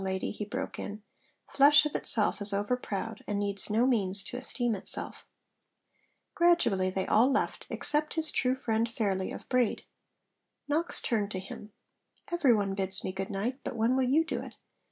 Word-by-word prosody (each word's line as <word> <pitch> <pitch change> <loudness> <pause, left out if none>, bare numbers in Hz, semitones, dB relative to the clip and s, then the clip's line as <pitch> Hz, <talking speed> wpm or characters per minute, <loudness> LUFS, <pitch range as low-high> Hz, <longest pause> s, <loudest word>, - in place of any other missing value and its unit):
lady,' 190 0 -3
he 210 - -6
broke 205 - -6
in; 210 +1 -7 0.4
'flesh 285 +2 +5
of 300 - -3
itself 215 -1 +4
is 205 0 +6
overproud, 220 0 -3
and 205 - -2
needs 200 0 -2
no 220 +4 +2
means 200 -6 +1
to - - -9
esteem 245 -2 -2
itself.' 195 - 0 1.1
Gradually 340 - +2
they 190 0 -2
all 240 +5 +3
left, 270 - -2
except 300 +2 0
his 320 -2 +2
true 255 0 0
friend 230 -3 -1
Fairley 195 -5 -2
of - - -9
Braid. 250 -3 0 0.8
Knox 315 +4 -1
turned 215 -4 -1
to 190 - -5
him: 205 +2 -10 0.6
'Every 305 -9 +3
one 200 -2 -1
bids 190 -1 +1
me - - -3
good 190 0 -5
night; 225 +7 -3
but - - -5
when 230 +3 +1
will 260 -1 +1
you 315 +5 +3
do - - -4
it? - - -11
220 Hz, 175 wpm, -29 LUFS, 200-260 Hz, 1.1 s, is